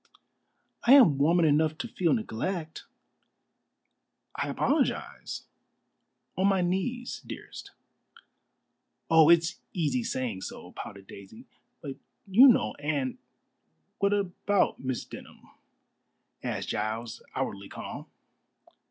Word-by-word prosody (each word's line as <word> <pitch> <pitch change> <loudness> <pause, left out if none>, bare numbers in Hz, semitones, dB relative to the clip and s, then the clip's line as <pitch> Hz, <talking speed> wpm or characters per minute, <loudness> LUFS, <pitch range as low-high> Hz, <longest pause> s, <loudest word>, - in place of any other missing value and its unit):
"I 250 - +9
am 185 - +7
woman 165 +4 +4
enough 155 +1 +2
to 155 - -4
feel 175 -3 0
neglect." 170 - -4 1.5
"I - - -2
apologize - - -1 0.9
on 190 +1 +2
my 195 -2 +3
knees, 235 +8 -2
dearest." - - -9 1.4
"Oh, 160 -1 +7
it's 170 +1 +4
easy 180 +8 0
saying 125 - -3
so," - - -8
pouted 100 -1 -9
Daisy, 100 - -12 0.4
"but 140 -3 -6 0.3
you 215 +7 +7
know 110 - +4
Anne 145 -3 -2 0.4
" 80 0 -47
"What 200 0 +2
about 200 0 0
Miss 130 -2 -3
Denham?" - - -12 1.0
asked - - -3
Giles, 110 +2 -3
outwardly 100 0 -3
calm. - - -8
160 Hz, 105 wpm, -28 LUFS, 130-195 Hz, 1.5 s, I